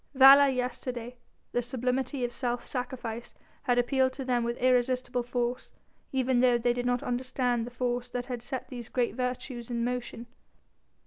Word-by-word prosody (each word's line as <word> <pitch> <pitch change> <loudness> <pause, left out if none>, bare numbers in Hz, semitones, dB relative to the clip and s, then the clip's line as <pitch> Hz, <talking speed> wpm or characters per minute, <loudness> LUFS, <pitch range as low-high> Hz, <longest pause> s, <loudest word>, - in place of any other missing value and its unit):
Valour 275 +1 +9
yesterday, 250 -2 -3 0.4
the 245 - +1
sublimity 255 +2 -2
of 240 - -5
self 245 -1 -2
sacrifice, 245 -2 -5 0.3
had 245 -2 +1
appealed 260 +1 +3
to 265 0 -6
them 245 -2 +1
with 235 +1 -2
irresistible 250 0 +2
force, 245 +1 -3 0.4
even 260 -1 +2
though 245 -1 +5
they 240 +1 +2
did 245 0 -2
not 245 0 +1
understand 245 -1 -1
the - - -5
force 245 0 -2
that 245 0 -3
had 245 -2 -5
set 260 +1 -5
these 240 -3 -7
great 245 -4 0
virtues 250 -1 -4
in 235 -1 -1
motion. 245 -1 -4
245 Hz, 165 wpm, -29 LUFS, 240-255 Hz, 0.4 s, Valour